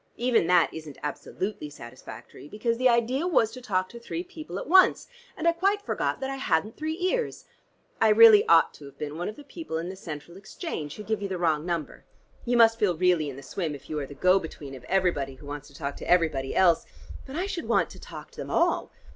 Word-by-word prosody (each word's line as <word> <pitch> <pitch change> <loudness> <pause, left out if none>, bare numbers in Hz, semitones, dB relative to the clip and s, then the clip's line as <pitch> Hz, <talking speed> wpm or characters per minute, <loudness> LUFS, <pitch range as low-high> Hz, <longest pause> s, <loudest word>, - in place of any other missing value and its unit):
Even 240 -8 +2
that 180 -2 +4
isn't 155 -3 -9
absolutely 150 +3 -4
satisfactory, 120 -1 -11
because 230 +6 -2
the 255 0 +5
idea 245 +7 +1
was 230 -11 +3
to 255 +2 -9
talk 185 -5 0
to 235 - -10
three 330 +9 -5
people 345 -4 -8
at - - -5
once, 370 +3 +5 0.3
and - - -1
I - - +7
quite 390 +5 +1
forgot - - -1
that 265 - -2
I 270 - -4
hadn't 215 -4 0
three 315 +1 -3
ears. 450 +7 -1 0.6
I 225 - +6
really 215 -1 +8
ought 165 -1 +5
to 145 - -13
have 140 - -13
been 150 0 -5
one 175 +4 -3
of 215 - -8
the 290 - -12
people 285 - -6
in 170 +2 -4
the 190 - -6
Central 170 -1 -8
Exchange, 195 - -6
who 210 - -8
give 220 -1 -2
you 200 - -2
the 190 -1 -3
wrong 160 -2 0
number. 170 -3 -4 0.4
You 245 0 +2
must 225 -1 +6
feel 190 -6 +2
really 175 -4 +2
in 135 - -7
the 135 - -10
swim, 155 +1 -3
if 140 +1 -12
you 155 - -1
are 140 - -4
the 145 - -11
go 185 +4 +4
between 150 -5 -9
of 130 -2 -10
everybody 170 -7 0
who 140 - -15
wants 145 0 -7
to 140 - -18
talk 140 -1 -4
to - - -8
everybody 160 -7 +2
else; 175 -3 +4 0.4
but 265 - -8
I 355 +4 -1
should 365 -4 -4
want - - +2
to - - -12
talk - - -10
to - - -20
them - - -6
all. - - +1
185 Hz, 240 wpm, -27 LUFS, 150-240 Hz, 0.6 s, really